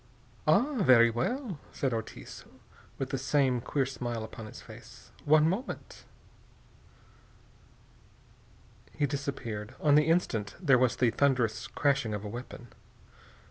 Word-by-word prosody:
"Ah, 270 -3 +3
very 120 -7 +6
well," 195 - -2
said 135 -3 -1
Ortiz, 110 -1 -6 0.5
with 135 -1 -4
the 135 - -1
same 130 -2 +1
queer 135 +2 0
smile 120 -3 -4
upon 110 0 -8
his - - -11
face. - - -14
"One 155 +1 +5
moment." 195 +10 -4 2.9
He 145 - 0
disappeared. 130 -5 -4
On 150 -2 +3
the 150 +1 +5
instant 115 - 0
there 140 -8 +4
was 130 -2 +2
the 125 -3 +2
thunderous 120 -3 +1
crashing 140 -8 0
of 105 +1 -6
a - - -4
weapon. 120 +1 -9
130 Hz, 125 wpm, -29 LUFS, 115-145 Hz, 2.9 s, very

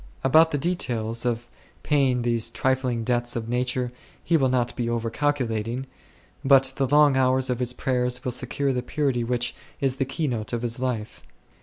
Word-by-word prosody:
About 160 +5 +5
the 145 - -1
details 120 -8 -1
of 120 0 -2 0.4
paying 135 -5 +2
these 115 -1 +1
trifling 125 0 0
debts 120 0 0
of 115 -1 -3
nature 125 +1 -1 0.3
he 170 - +1
will 135 -5 +3
not 125 -2 0
be 120 -1 -2
over 115 -1 -2
calculating, 125 -3 -1 0.6
but 135 -1 +5
the 135 - +1
long 145 0 +5
hours 130 0 +3
of 125 - -2
his 125 0 -1
prayers7 125 0 -1
will 125 - 0
secure 135 +3 -1
the 125 - -1
purity 130 -2 -1
which 120 +1 0 0.3
is 135 -1 0
the 135 - 0
key 145 +4 -3
note 115 -3 -3
of 120 0 -2
his 120 0 -2
life. 125 -4 -3
125 Hz, 180 wpm, -25 LUFS, 120-135 Hz, 0.6 s, About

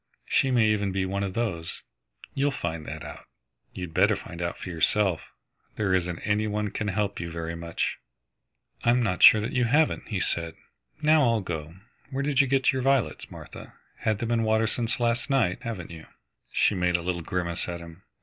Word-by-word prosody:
She 135 - +2
may 120 -4 +4
even 105 -2 +1
be 95 0 0
one 100 +1 -2
of 95 -2 -3
those. 85 -8 -3 0.5
You'll 140 +1 +1
find 80 - -4
that - - -6
out. - - -9 0.5
You'd 90 -3 -7
better 100 +4 +4
find 85 -3 -8
out 85 0 -2
for - - -8
yourself. 90 +2 +2 0.5
There 100 -3 0
isn't 90 -2 0
any 105 +1 +1
one 105 -1 -2
can 105 - -3
help 100 0 -1
you 85 - -4
very 85 0 -4
much." 85 0 -3 0.8
"I - - +3
am 120 +1 +4
not 90 -5 -1
sure 110 - +9
that 110 +7 -3
you 125 -2 +2
haven't," 150 +6 +2
he 105 -4 -2
said. 85 -3 -2 0.5
"Now 155 0 +5
I'll 115 -5 +3
go. 80 -3 -5 0.3
Where 135 +1 -2
did 140 -1 +3
you 135 - +1
get 135 0 +3
your 130 - -1
violets, 130 - +1
Martha? - - -11 0.2
Had 110 -2 0
them 120 +1 -3
in 115 -1 +2
water 110 0 +2
since 115 +2 -1
last 120 +2 0
night, 115 -10 +2
haven't 95 -8 -5
you?" 80 -1 -10 0.4
She - - +3
made 90 -2 +2
a 85 - -6
little 90 -1 -2
grimace 85 0 -3
at 85 0 -4
him. 85 +1 -12
100 Hz, 200 wpm, -27 LUFS, 85-120 Hz, 0.8 s, sure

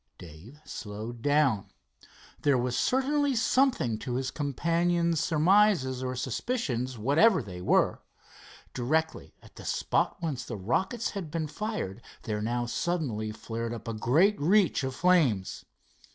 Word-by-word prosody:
Dave 90 - -13
slowed 110 +2 -7
down. 145 -6 +2 0.7
There 140 -3 +3
was 125 0 -1
certainly 280 +1 +1
something 245 - +2
to 120 +3 -4
his 130 0 -2
companion's 170 +3 0
surmises 165 -4 +3
or 130 0 -3
suspicions, 130 - -2
whatever 155 - +4
they 90 -3 -8
were. - - +2 0.7
Directly 155 +6 -1
at - - -18
the - - -9
spot - - 0
whence 155 -7 -3
the 115 - -6
rockets 190 - -1
had 190 -6 -5
been 160 +1 -2
fired 150 - -4 0.2
there 105 -1 -3
now 120 +2 -1
suddenly 120 -7 -2
flared 115 +2 -5
up 115 - -10
a 115 - -2
great 155 - +3
reach 180 -2 +3
of 130 -1 -3
flames. 150 - +2
140 Hz, 135 wpm, -28 LUFS, 115-175 Hz, 0.7 s, whatever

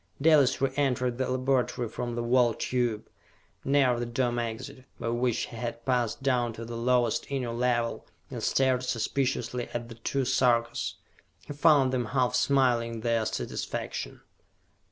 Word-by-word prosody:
Dalis 140 -4 +4
re 135 -1 +1
entered 125 -3 0
the 130 - 0
laboratory 130 -1 0
from 120 +2 -4
the 120 - -2
Wall 120 -1 +3
Tube, 120 -4 -1 0.6
near 135 -3 +3
the 120 - -2
Dome 120 0 0
Exit, 120 +4 -5
by 115 - -2
which 120 0 0
he - - -10
had 115 0 -5
passed 125 -1 0
down 125 -3 +1
to 115 +1 -7
the 115 +1 -6
lowest 120 -1 +1
Inner 130 -4 -2
Level, 120 -1 -1 0.2
and - - -5
stared 130 -2 +2
suspiciously 125 0 -1
at 120 0 -4
the - - -8
two 135 +3 -1
Sarkas. 120 -2 +1 0.5
He - - -6
found 145 -3 +4
them 125 -2 0
half 125 +2 0
smiling 120 -4 +2
their 115 -1 +1
satisfaction. - - -4
125 Hz, 155 wpm, -28 LUFS, 120-130 Hz, 0.6 s, Dalis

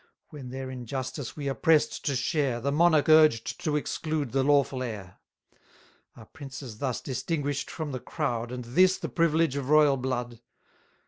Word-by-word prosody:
When 140 -4 -9
their 130 0 -6
injustice 130 +2 -5
we 145 -2 -4
are 135 - 0
press'd 160 +2 +2
to 140 - 0
share, 130 -2 0
The 140 +4 -1
monarch 155 0 +3
urged 155 -8 +4
to 150 -2 0
exclude 150 -2 -2
the 135 - +1
lawful 140 -2 +2
heir; 105 -7 -6 1.0
Are 110 - -13
princes 135 -6 -10
thus 130 -4 -2
distinguish'd 140 +1 -3
from 155 -2 -5
the 130 - -4
crowd, 120 -6 -3
And 125 -1 -6
this 185 +10 +3
the - - -5
privilege 165 -3 +1
of 140 -1 -4
royal 150 -2 +5
blood? 120 -2 -4
140 Hz, 165 wpm, -27 LUFS, 125-150 Hz, 1.0 s, royal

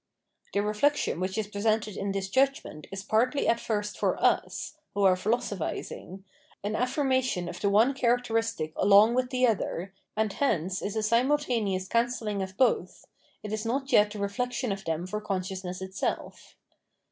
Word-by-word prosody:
The 200 - +2
reflection 215 - +1
which 185 +2 -2
is 220 - 0
presented 210 0 0
in 200 -1 -2
this 195 -1 -2
judgment 260 - 0
is 195 0 -5
partly 245 +7 +1
at 230 - +4
flrst 210 -2 -2
for - - +1
us - - 0 0.2
[who 200 - +1
are 190 -1 +6
philosophising] 195 -2 -3 0.4
an 210 +1 -2
affirmation 255 - 0
of - - -7
the 200 - +2
one 220 +7 +4
characteristic 225 -9 0
along 205 +3 +6
with 255 0 +1
the 255 0 +2
other, 195 -4 -1 0.2
and 215 -2 +1
hence 190 - 0
is 200 - -3
a 220 - 0
simultaneous 230 -5 +1
cancelling 230 -3 0
of 190 0 -6
both; 230 -8 +1 0.4
it 210 0 -5
is 215 0 -2
not 270 +4 -2
yet 210 0 +5
the 210 - -8
reflection 240 +4 -2
of 195 0 -5
them 165 +1 -2
for 210 +3 -4
consciousness 190 -2 -4
itself. 190 0 -4
210 Hz, 160 wpm, -28 LUFS, 195-245 Hz, 0.4 s, are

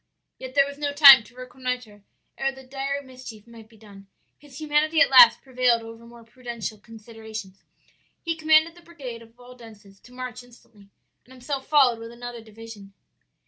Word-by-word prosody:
"Yet 260 0 -10
there 280 -1 +4
was 285 0 -10
no 290 -1 -3
time 275 -5 +9
to 235 - -20
reconnoitre 250 -4 -7 0.3
ere 270 0 -2
the 265 0 -15
dire 275 +2 -5
mischief 255 -5 -13
might 230 -2 -16
be 225 - -21
done. 200 -2 -17 0.3
His 285 -1 -14
humanity 310 +1 0
at 330 - +4
last 245 -3 +7
prevailed 250 -3 0
over 225 +1 -13
more 235 0 -16
prudential 235 -2 -8
considerations. 220 -3 -12 0.6
He 330 -1 -4
commanded 315 +1 +2
the 345 - -19
brigade 275 -9 -10
of 230 +1 -19
Waldenses 225 -5 -16
to 245 - -20
march 250 -1 -8
instantly, 230 -4 -21 0.4
and 255 - -22
himself 265 +1 -6
followed 265 -6 +3
with 230 0 -10
another 240 0 -9
division. 220 -2 -14
245 Hz, 170 wpm, -23 LUFS, 225-270 Hz, 0.6 s, time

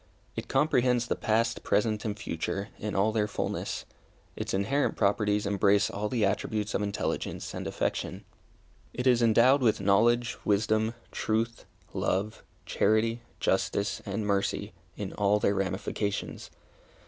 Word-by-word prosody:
It - - -5
comprehends 130 -4 +2
the - - -1
past, 115 +1 +1
present, 105 0 +1
and 105 -1 -2
future, 100 +2 -3
in 105 0 -3
all 100 +3 +3
their 105 -1 +1
fulness. 105 - -3 0.5
Its - - -4
inherent 115 +10 +1
properties 105 +1 +1
embrace 100 0 +3
all 105 +1 -2
the 115 -3 +1
attributes 105 +1 -1
of - - 0
intelligence 100 -1 -3
and - - -4
affection. - - -2 0.7
It 125 - -2
is 125 -2 +4
endowed 120 +4 +5
with 115 -4 +3
knowledge, 115 +5 +3
wisdom, 110 +2 +1 0.2
truth, 115 +2 -1 0.3
love, 105 +4 -1 0.2
charity, 115 +2 +2 0.2
justice, 100 0 0
and 105 +2 -3
mercy, 100 -1 -1 0.2
in - - -5
all 105 +1 +2
their 100 -1 +2
ramifications. 95 +1 -2
105 Hz, 135 wpm, -29 LUFS, 100-115 Hz, 0.7 s, endowed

